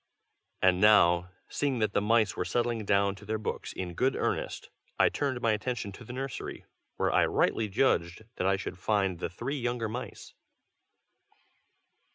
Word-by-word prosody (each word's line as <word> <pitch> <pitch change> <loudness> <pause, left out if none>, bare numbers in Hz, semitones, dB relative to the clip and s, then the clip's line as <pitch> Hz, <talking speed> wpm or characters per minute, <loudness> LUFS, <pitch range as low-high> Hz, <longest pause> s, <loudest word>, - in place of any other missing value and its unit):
And 95 0 +4
now, 90 -4 +5 0.2
seeing 140 -3 -1
that 110 -2 0
the - - +2
mice 110 -1 +2
were - - -1
settling 115 +3 -1
down 100 0 +2
to 100 - -14
their 110 +1 -2
books 110 - -4
in 90 -2 -5
good 130 +9 +1
earnest, - - -2 0.3
I - - +5
turned 140 -4 -2
my 115 - +3
attention 110 -1 -2
to 100 - -11
the 120 - -9
nursery, 135 +1 -5 0.3
where - - +1
I - - +4
rightly 110 -2 +1
judged 95 -4 +1
that 90 - 0
I 95 - +3
should 95 -1 -6
find 95 -3 0
the - - -3
three 130 +9 -4
younger 120 -2 -1
mice. 120 +4 -7
110 Hz, 170 wpm, -29 LUFS, 95-120 Hz, 0.3 s, now